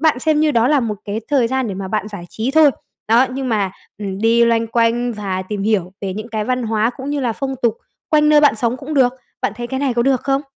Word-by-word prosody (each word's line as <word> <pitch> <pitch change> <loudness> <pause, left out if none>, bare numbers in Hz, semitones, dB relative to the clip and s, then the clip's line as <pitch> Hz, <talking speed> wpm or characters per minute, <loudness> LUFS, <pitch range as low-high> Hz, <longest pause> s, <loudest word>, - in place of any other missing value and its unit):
bạn 310 -5 +3
xem 305 +2 +2
như 310 0 +3
đó 235 0 +3
là 295 -3 +3
một 215 -4 -3
cái 210 +1 -3
thời 275 -5 +3
gian 260 -2 -1
để 195 - -4
mà 190 0 -5
bạn 215 +1 -2
giải 200 -5 -8
trí 225 +4 -2
thôi. 310 0 +6 0.4
Đó, 235 +4 +5
nhưng 260 0 -3
mà, 205 -4 0 0.3
ừm, 195 -2 -4
đi 230 +2 +4
loanh 230 -1 +2
quanh 235 +1 +1
và 195 -3 -3
tìm 205 -2 -3
hiểu 195 -4 0
về 190 -2 -3
những 215 +3 -6
cái 215 -2 -2
văn 255 +1 -1
hóa 220 +1 +1
cũng 275 0 -5
như 290 -1 -1
là 245 -3 0
phong 270 +3 -4
tục 230 -2 +2 0.4
quanh 300 -1 +4
nơi 300 -1 +6
bạn 290 -4 +5
sống 235 +2 0
cũng 285 +4 -6
được. 255 -3 +4 0.3
Bạn - - 0
thấy 240 - -4
cái 265 +2 -3
này 270 -4 0
có 235 - +2
được 265 -1 +2
không? 275 +1 0
235 Hz, 275 wpm, -18 LUFS, 215-270 Hz, 0.4 s, thôi